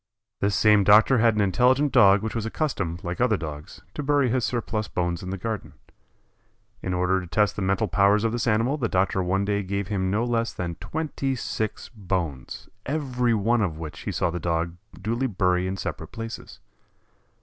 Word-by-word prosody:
This 100 -1 +1
same 105 -2 +5
doctor 110 +6 +6
had 115 -1 +4
an 105 - +2
intelligent 125 +9 +3
Dog 100 -1 +6
which 110 - -3
was 115 - -2
accustomed, 100 - -2
like 90 +4 -4
other 115 -4 +3
Dogs, 75 -3 -8
to - - -4
bury 145 -2 +2
his 125 +1 0
surplus 115 -3 -2
bones 85 -1 -2
in 90 - -6
the 95 - -3
garden. 110 +2 -5 1.1
In 95 - -3
order 90 +1 +1
to 90 - -9
test 105 +6 +1
the - - -4
mental 95 +3 +1
powers 100 +3 +3
of 115 - +1
this 120 +1 -2
animal 115 +6 +2
the 120 -6 -1
doctor 95 +1 +1
one 95 +2 0
day 100 0 0
gave 100 0 -3
him 95 -3 -1
no 105 +4 +1
less 115 -1 -1
than 85 -2 -4
twenty 145 -4 -3
six 110 -2 -4
bones, 90 - -4 0.2
every 125 -5 0
one 110 +3 +2
of 85 -7 -1
which 80 -2 -7
he - - -4
saw - - 0
the 90 - -4
Dog 85 0 -1 0.2
duly 115 +6 -1
bury 90 -4 +1
in 95 +1 -3
separate - - -5
places. 115 0 -8
105 Hz, 195 wpm, -25 LUFS, 90-115 Hz, 1.1 s, doctor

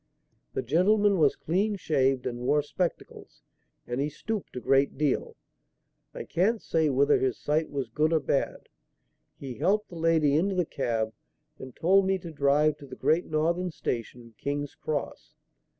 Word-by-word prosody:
"'The - - -1
gentleman 200 - +3
was 145 -3 +4
clean 200 +6 0
shaved 135 -8 +1
and 120 0 -3
wore 145 +4 +2
spectacles, 175 +4 -5 0.4
and 120 +2 -2
he 145 - 0
stooped 210 +5 -5
a - - -2
good 135 +2 +2
deal. 145 -2 0 0.8
I - - -6
can't 205 +7 +1
say 160 -5 +1
whether 140 +2 +3
his 130 -2 0
sight 155 +2 0
was 135 -5 -4
good 155 +6 +1
or 160 - +3
bad. 140 -1 -2 0.7
He 135 -3 -7
helped 210 +2 +1
the 175 - -10
lady 160 -3 +3
into 190 +5 +1
the 180 -2 +1
cab 115 -6 -2 0.5
and 130 -1 -10
told 190 +3 +3
me 190 0 +2
to 170 -2 -9
drive 145 +1 +2
to 140 - -12
the - - -9
Great 165 +3 +1
Northern 170 +4 0
Station, 120 -5 -5
King's 145 0 -3
Cross. 150 -2 -5
150 Hz, 165 wpm, -27 LUFS, 135-175 Hz, 0.8 s, was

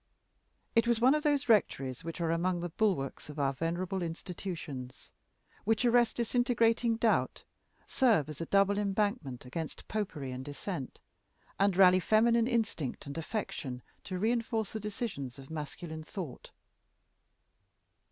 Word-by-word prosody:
It 230 +1 +4
was 235 -2 +3
one 255 +4 +6
of 300 - +1
those 290 -2 +1
rectories 135 - +2
which 165 +1 -6
are 165 -1 +1
among 175 +2 +1
the 175 - -3
bulwarks 170 -10 -1
of 150 - -8
our 140 -1 +1
venerable 175 +5 -2
institutions 165 -6 -6 0.5
which 225 +3 +2
arrest 240 -1 +4
disintegrating 235 -1 +2
doubt, 225 -1 +1 0.4
serve 225 - +3
as 155 0 -7
a 165 - -3
double 200 +1 +3
embankment 200 - -1
against 155 +5 -6
Popery 165 -11 -3
and 130 +1 -5
Dissent, 145 +1 -5 0.6
and 195 -2 +3
rally 185 -1 +7
feminine 230 +4 +4
instinct 220 - -1
and 140 - -6
affection 160 - -4 0.2
to 185 - -3
reinforce 225 0 0
the 220 - -2
decisions 200 - -4
of 135 +2 -12
masculine 155 +1 -6
thought. 165 -4 -7
185 Hz, 135 wpm, -31 LUFS, 155-225 Hz, 0.6 s, rally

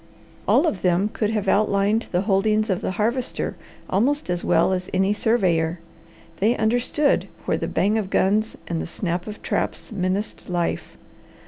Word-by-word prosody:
All - - +4
of 205 - -1
them 180 +3 +2
could 210 - 0
have 215 -2 -1
outlined 205 +2 +2
the 180 - +1
holdings 215 +2 +2
of 185 - -1
the - - -2
Harvester 235 +4 -1 0.3
almost 250 +3 +1
as 175 -1 -1
well 190 - +3
as 180 0 -3
any 190 +2 +3
surveyor. 180 -7 +1 0.6
They 220 +7 +2
understood 245 +6 +1 0.2
where - - +1
the - - -3
bang 210 +3 +1
of 195 -3 -4
guns 210 +4 +1
and 165 -1 -2
the - - -5
snap 175 +1 -3
of 210 - -8
traps - - -2
menaced 195 +1 -3
life. 175 -1 -2
205 Hz, 160 wpm, -23 LUFS, 185-220 Hz, 0.6 s, All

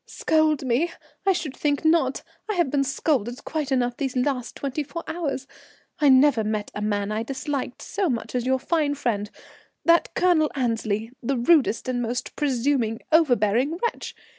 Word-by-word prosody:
"Scold 310 -3 +1
me! 260 +8 +1 0.4
I - - +7
should 315 -7 -3
think 290 +1 -1
not! 315 -5 +2 0.3
I 425 - 0
have 340 -7 +1
been 280 -1 +2
scolded 260 -3 -1
quite 300 -3 -3
enough 245 -2 +1
these 270 -2 -2
last 250 -1 -1
twenty 280 +2 -3
four 335 +4 -6
hours. 290 -6 -3 0.5
I 295 -2 +5
never 260 -3 +5
met 215 -1 -2
a 210 - -5
man 205 -1 -1
I 215 +1 -1
disliked 270 +1 -4
so 395 -4 -1
much 230 -3 -3
as 250 -1 0
your 260 0 +3
fine 295 +1 0
friend, 210 -7 -2 0.6
that 335 0 +4
Colonel 340 -4 +3
Annesley, 225 -3 -1
the 265 +2 -1
rudest, 250 -2 +3
most 245 +1 -3
presuming, 255 -5 0
overbearing 260 -2 +3
wretch. 470 +5 -3
265 Hz, 165 wpm, -24 LUFS, 235-305 Hz, 0.6 s, I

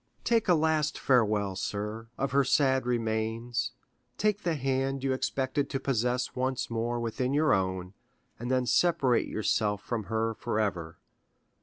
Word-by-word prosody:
Take 230 -2 +2
a 180 - +5
last 155 -1 +1
farewell, 105 -6 +2
sir, 105 +3 -4
of 135 -1 -1
her 140 +1 +4
sad 130 -1 +2
remains; 115 0 -1 0.5
take 210 -1 +1
the 170 -4 0
hand 135 0 -1
you 135 -1 +1
expected 130 +1 -1
to 135 - -2
possess 125 -1 0
once 130 -1 -1
more 120 +1 -1
within 125 +3 -1
your 155 +1 +4
own, 95 -1 -1 0.5
and 120 +2 -4
then 130 -1 +2
separate 135 -4 +3
yourself 105 -1 0
from 115 -4 -3
her 110 +1 -1
forever. 95 -8 -2
125 Hz, 145 wpm, -29 LUFS, 110-135 Hz, 0.5 s, a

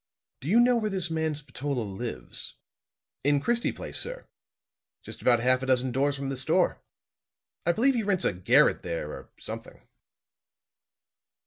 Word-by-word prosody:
"Do 135 - -8
you 225 +5 +5
know 245 0 +5
where 215 -2 0
this 185 -4 -1
man 160 -1 0
Spatola 140 -3 -4
lives?" 100 - -3 0.7
"In 145 +1 +3
Christie 235 +10 +1
Place, - - -5
sir; - - -2 0.8
just - - -9
about 120 -2 +4
half 130 +1 +3
a 130 - -4
dozen 130 0 +2
doors 140 +3 +1
from 135 -1 -4
the 135 - -3
store. 130 - +1 0.9
I - - +6
believe 255 +9 +3
he 235 - 0
rents 200 -4 0
a - - +2
garret 90 0 +4
there, 80 -2 -4
or - - -10
something." - - -9
140 Hz, 155 wpm, -28 LUFS, 125-200 Hz, 0.9 s, I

